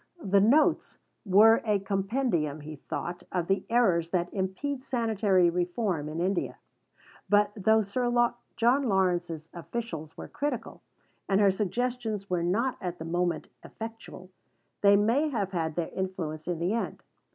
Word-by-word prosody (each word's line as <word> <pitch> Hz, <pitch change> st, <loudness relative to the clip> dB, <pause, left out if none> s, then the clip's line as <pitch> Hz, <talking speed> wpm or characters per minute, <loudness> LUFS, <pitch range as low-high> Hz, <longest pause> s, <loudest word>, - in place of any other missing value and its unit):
The 195 Hz, +1 st, +3 dB
"Notes" 265 Hz, +10 st, +3 dB, 0.3 s
were 215 Hz, +4 st, +6 dB
a 210 Hz, -3 st, +2 dB
compendium, 195 Hz, -, -1 dB
he 155 Hz, +1 st, -8 dB
thought, 175 Hz, +5 st, -5 dB
of 180 Hz, -2 st, -1 dB
the 195 Hz, +2 st, 0 dB
errors 190 Hz, -9 st, +3 dB
that 175 Hz, -1 st, -1 dB
impede 235 Hz, +9 st, -3 dB
sanitary 215 Hz, -8 st, +2 dB
reform 175 Hz, -2 st, -1 dB
in 155 Hz, +2 st, -5 dB
India. 185 Hz, +1 st, -1 dB, 0.7 s
But 205 Hz, 0 st, +4 dB
though 220 Hz, +2 st, +3 dB
Sir 240 Hz, +5 st, -1 dB, 0.4 s
John 245 Hz, +5 st, +3 dB
Lawrence's 175 Hz, -4 st, 0 dB
officials 170 Hz, -4 st, -6 dB
were -, -, -7 dB
critical, 280 Hz, -6 st, -4 dB, 0.5 s
and 195 Hz, 0 st, +3 dB
her 200 Hz, -2 st, +5 dB
suggestions 220 Hz, 0 st, -2 dB
were 180 Hz, -1 st, +1 dB
not 225 Hz, +9 st, 0 dB
at 180 Hz, -1 st, -4 dB
the 160 Hz, -, -7 dB
moment 175 Hz, 0 st, -1 dB
effectual, 225 Hz, -4 st, -9 dB, 0.5 s
they 200 Hz, 0 st, +6 dB
may 235 Hz, +9 st, +2 dB
have 205 Hz, -8 st, -2 dB
had 160 Hz, -4 st, -2 dB
their 170 Hz, -2 st, -2 dB
influence 170 Hz, -5 st, -4 dB
in 175 Hz, -2 st, -1 dB
the 175 Hz, +5 st, 0 dB
end. 230 Hz, -, -3 dB
195 Hz, 145 wpm, -28 LUFS, 175-225 Hz, 0.7 s, were